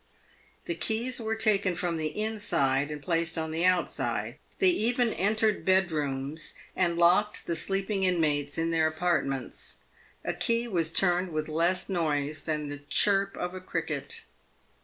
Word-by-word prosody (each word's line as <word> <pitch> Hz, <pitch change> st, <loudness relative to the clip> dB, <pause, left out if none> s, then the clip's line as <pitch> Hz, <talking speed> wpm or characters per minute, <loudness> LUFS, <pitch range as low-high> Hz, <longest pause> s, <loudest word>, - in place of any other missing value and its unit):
The 345 Hz, -, -2 dB
keys 235 Hz, -3 st, -1 dB
were 220 Hz, 0 st, -1 dB
taken 205 Hz, -4 st, +2 dB
from 175 Hz, -1 st, -1 dB
the 155 Hz, +4 st, -3 dB
inside 145 Hz, -11 st, +1 dB
and 150 Hz, -1 st, -6 dB
placed 165 Hz, -1 st, 0 dB
on 160 Hz, -1 st, -2 dB
the 165 Hz, +2 st, -1 dB
outside. 185 Hz, -1 st, 0 dB, 0.2 s
They 380 Hz, -, +4 dB
even 240 Hz, -5 st, +1 dB
entered 215 Hz, +2 st, +1 dB
bedrooms 155 Hz, -5 st, 0 dB, 0.2 s
and 170 Hz, -2 st, +1 dB
locked 180 Hz, +5 st, +3 dB
the 170 Hz, -, -1 dB
sleeping 195 Hz, +4 st, -1 dB
inmates 150 Hz, -6 st, +1 dB
in 165 Hz, 0 st, 0 dB
their 160 Hz, -1 st, +3 dB
apartments. 155 Hz, -5 st, -2 dB, 0.5 s
A -, -, 0 dB
key 235 Hz, +1 st, 0 dB
was 170 Hz, -7 st, 0 dB
turned 180 Hz, 0 st, +2 dB
with 155 Hz, -1 st, -2 dB
less 170 Hz, +4 st, +1 dB
noise 155 Hz, -5 st, -1 dB
than 150 Hz, -2 st, -2 dB
the 145 Hz, 0 st, -6 dB
chirp 195 Hz, +7 st, +3 dB
of 180 Hz, -, -3 dB
a 185 Hz, -, -7 dB
cricket. 160 Hz, -6 st, -3 dB
175 Hz, 150 wpm, -28 LUFS, 155-195 Hz, 0.5 s, They